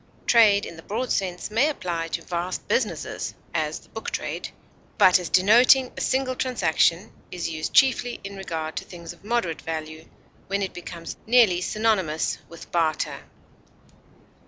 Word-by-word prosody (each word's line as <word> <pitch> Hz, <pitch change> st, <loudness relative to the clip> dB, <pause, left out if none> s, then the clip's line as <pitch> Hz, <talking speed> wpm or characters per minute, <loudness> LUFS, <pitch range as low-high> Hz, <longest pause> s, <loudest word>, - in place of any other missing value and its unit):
Trade 210 Hz, -4 st, +5 dB
in 170 Hz, -, -9 dB
the -, -, -10 dB
broad 230 Hz, +8 st, -3 dB
sense 185 Hz, +1 st, -2 dB
may 245 Hz, +8 st, +3 dB
apply 175 Hz, -, -3 dB
to -, -, -4 dB
vast 175 Hz, +1 st, -4 dB
businesses -, -, -2 dB, 0.2 s
(as -, -, -1 dB
the -, -, -22 dB
book -, -, -5 dB
trade), -, -, -4 dB, 0.5 s
but 185 Hz, 0 st, +6 dB
as 175 Hz, -3 st, -5 dB
denoting 245 Hz, +7 st, +5 dB
a -, -, -5 dB
single 260 Hz, -1 st, 0 dB
transaction 205 Hz, -6 st, +1 dB, 0.2 s
is 175 Hz, -2 st, -4 dB
used 155 Hz, 0 st, -3 dB
chiefly 250 Hz, -2 st, +3 dB
in 200 Hz, 0 st, -7 dB
regard 160 Hz, -5 st, -5 dB
to -, -, -3 dB
things 170 Hz, -1 st, -9 dB
of 175 Hz, -, -22 dB
moderate 215 Hz, -7 st, -1 dB
value, 155 Hz, 0 st, -6 dB, 0.4 s
when 200 Hz, +1 st, -1 dB
it 190 Hz, -, -4 dB
becomes 170 Hz, -1 st, -8 dB
nearly 225 Hz, -7 st, +5 dB
synonymous 190 Hz, -7 st, 0 dB
with 170 Hz, -, -12 dB
barter. 165 Hz, -2 st, -1 dB
185 Hz, 155 wpm, -25 LUFS, 165-225 Hz, 0.5 s, but